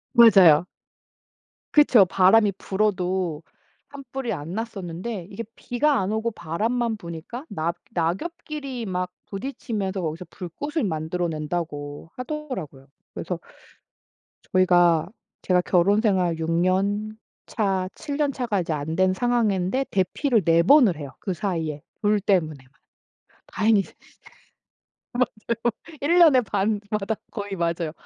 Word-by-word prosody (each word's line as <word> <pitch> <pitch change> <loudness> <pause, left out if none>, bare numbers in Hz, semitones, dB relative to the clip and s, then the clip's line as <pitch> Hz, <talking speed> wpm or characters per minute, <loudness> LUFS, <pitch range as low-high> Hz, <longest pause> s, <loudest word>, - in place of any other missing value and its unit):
맞아요. 190 -9 +7 1.1
그쵸. 265 - +6
바람이 195 +4 +4
불어도 185 -5 -1 0.5
산불이 270 -3 -5
안 165 -3 -5
났었는데 195 -3 -5
이게 210 +3 -5
비가 280 +3 +1
안 190 +1 -1
오고 220 +2 -1
바람만 225 +6 -1
부니까 170 - -8
낙 165 +2 -2 0.2
낙엽끼리 260 - -3
막 180 -2 -3
부딪히면서 200 -3 -4
거기서 165 +2 -4
불꽃을 290 - -4
만들어 165 +1 -2
낸다고 155 -2 -4
하더라고요. 250 - -6 0.3
그래서 - - -4 1.1
저희가 175 -3 +4 0.3
제가 180 -1 +2
결혼생활 185 -1 +2
6 160 0 -3
년 200 +5 0 0.3
차, 195 -4 0
7 285 -2 -5
년 295 -2 +1
차가 240 -7 -1
이제 170 - -4
안 155 +2 -3
된 185 +1 +3
상황인데 230 +1 +1
대피를 210 +5 +1
4 165 0 +5
번을 230 - +6
해요. 145 -3 -7
그 190 - -3
사이에 165 -6 -3 0.2
불 210 0 +3
때문에만. 155 -10 0 0.8
다행히. 215 -2 +2 1.3
맞아요. 235 -2 -2 0.4
1 335 +5 +3
년에 310 -7 +7
반마다 210 0 -1
거의 205 -1 -5
맞아요. 170 -2 -1
195 Hz, 250 characters per minute, -24 LUFS, 170-230 Hz, 1.3 s, 맞아요